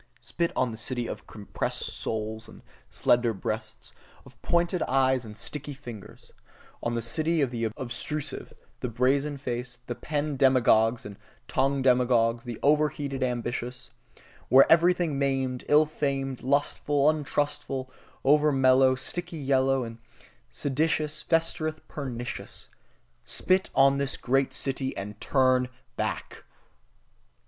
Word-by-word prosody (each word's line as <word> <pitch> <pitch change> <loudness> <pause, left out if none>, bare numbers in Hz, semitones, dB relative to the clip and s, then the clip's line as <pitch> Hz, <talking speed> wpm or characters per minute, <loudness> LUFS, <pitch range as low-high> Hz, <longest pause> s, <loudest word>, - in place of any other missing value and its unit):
Spit 170 0 -2
on 125 -2 +1
the 110 - -7
city 120 +1 -2
of - - -7
compressed 105 -3 -4
souls 110 0 -4
and - - -14 0.3
slender 120 -2 +2
breasts, - - -5 0.3
of - - -18
pointed 175 +1 +1
eyes 130 -2 +2
and 105 0 -10
sticky 145 +2 -6
fingers 120 -7 -11 0.5
On 120 0 -1
the 115 - -1
city 160 +8 0
of 135 -4 +1
the 115 -2 -2
obtrusive, 140 +4 -5 0.3
the - - -2
brazen 135 +5 +1
faced, 125 -2 -5
the 120 - -3
pen 150 +1 -3
demagogues 120 -3 +4
and 100 -1 -8 0.3
tongue 135 0 +1
demagogues, 120 -2 +3
the 120 -2 -5
overheated 145 -2 +1
ambitious: 125 0 -3 0.6
Where 135 +1 +8
everything 170 -3 +4
maimed, 135 -2 -1
ill 150 +1 +6
famed, 135 -3 -2
lustful, 140 +1 +1
untrustful, 145 -3 -1 0.3
over 150 +2 +4
mellow, 130 -1 +5
sickly 175 +6 -4
yellow 135 -2 +2
and 115 0 -8 0.5
seditious, 150 +1 -1
festereth 155 -1 -1
pernicious: 125 -4 -6 0.5
Spit 185 +1 +1
on 135 +1 +5
the 140 0 -2
great 135 +2 +1
city 135 -1 -2
and 100 +1 -7
turn 130 -2 +3 0.3
back! - - -4
135 Hz, 125 wpm, -27 LUFS, 125-145 Hz, 0.6 s, Where